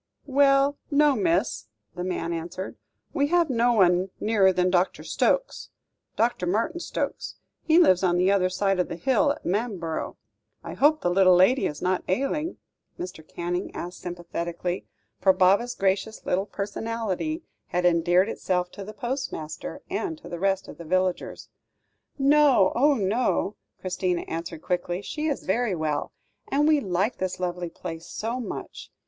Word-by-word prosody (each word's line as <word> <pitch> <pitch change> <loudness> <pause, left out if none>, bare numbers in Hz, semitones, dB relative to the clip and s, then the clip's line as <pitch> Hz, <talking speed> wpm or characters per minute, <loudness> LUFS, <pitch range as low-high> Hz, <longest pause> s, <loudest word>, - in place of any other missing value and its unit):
"Well, 275 0 +3
no, 290 -1 +4
miss," 185 - 0 0.3
the 180 +1 -5
man 180 -2 -2
answered; 170 +3 -5 0.4
"we 285 0 +2
have 340 -2 +2
no 240 0 +3
one 185 -3 +3
nearer 210 -3 +4
than 180 0 +1
Dr. 180 +1 +1
Stokes - - 0 0.5
Dr. 230 -6 0
Martin 230 - 0
Stokes. - - -4 0.3
He 320 0 +3
lives 185 - +5
on 175 -2 +2
the 185 +2 +3
other 185 -2 +3
side 195 +1 0
of 180 - +1
the - - -5
hill 260 - +2
at - - -14
Manborough. 185 -5 -2 0.5
I - - -6
hope 305 +2 +3
the 175 - +1
little 185 0 +6
lady 190 +9 +4
is 150 - -6
not 185 0 +1
ailing?" 275 - -1 0.4
Mr. 180 -3 -6
Canning 175 +3 -3
asked 175 +2 -6
sympathetically, 175 0 -4 0.3
for 190 0 +5
Baba's 195 +7 +3
gracious 195 +3 -1
little 190 +3 0
personality 225 - -3 0.2
had 180 0 -1
endeared 175 +2 +4
itself 180 -4 -1
to 200 - -8
the 210 +2 -9
postmaster, 240 - -5
and 330 -5 -3
to 305 - -13
the 175 - -6
rest 195 +1 0
of - - -11
the - - -7
villagers. 185 +2 -1 0.7
"No; 280 -7 +5
oh, 285 +4 +4
no!" 210 -1 0 0.2
Christina 180 -1 -1
answered 165 0 -6
quickly; 180 +1 -2
"she 305 +7 -3
is 290 - -2
very 220 0 0
well, 155 -2 -2 0.4
and 290 +2 +2
we 310 -1 +5
like 195 0 -1
this 185 -1 -2
lovely 180 -1 -3
place 165 0 -8
so 230 +4 -3
much. 245 - -7
190 Hz, 155 wpm, -26 LUFS, 180-250 Hz, 0.7 s, little